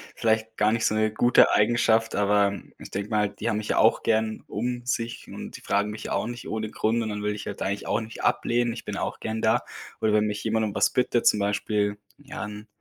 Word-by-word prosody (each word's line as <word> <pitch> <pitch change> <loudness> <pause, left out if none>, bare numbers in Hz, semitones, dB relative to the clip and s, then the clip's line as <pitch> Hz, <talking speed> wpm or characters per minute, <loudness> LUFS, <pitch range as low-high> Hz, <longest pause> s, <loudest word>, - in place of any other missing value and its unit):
vielleicht 110 0 0
gar 105 +1 +3
nicht 115 0 0
so 110 - +2
'ne 110 0 +1
gute 120 +2 +5
Eigenschaft, 115 +1 +3
aber 100 0 +3 0.3
ich - - -10
denke 100 +3 -4
mir 105 - +2
halt, 105 -1 -1
die 115 - -3
haben 110 -2 +1
mich 105 - -4
ja - - 0
auch 110 - +4
gern 110 -1 0
um 120 +2 -3
sich 120 -3 -3
und - - -8
die - - -10
fragen 105 +1 0
mich 105 - -8
ja - - -3
auch - - 0
nicht 120 +1 -6
ohne 110 -1 -3
Grund 115 +1 0
und 110 - -3
dann 105 0 -4
will 105 0 -1
ich 105 - -7
halt 100 - -6
eigentlich 100 +1 -2
auch 115 - 0
nicht 110 0 -8
ablehnen. 120 -1 +1
Ich - - -9
bin - - -4
auch - - -3
gern 110 0 -4
da. - - +3 0.4
Und 110 -1 +1
wenn 105 0 +3
mich 105 -1 -3
jemand 110 0 +1
um 105 - -3
was - - +3
bittet, 125 -1 +1
zum 105 - +5
Beispiel, 105 0 0 0.2
ja, 145 +1 -7
'n 105 +1 -8
110 Hz, 255 wpm, -26 LUFS, 105-115 Hz, 0.4 s, gute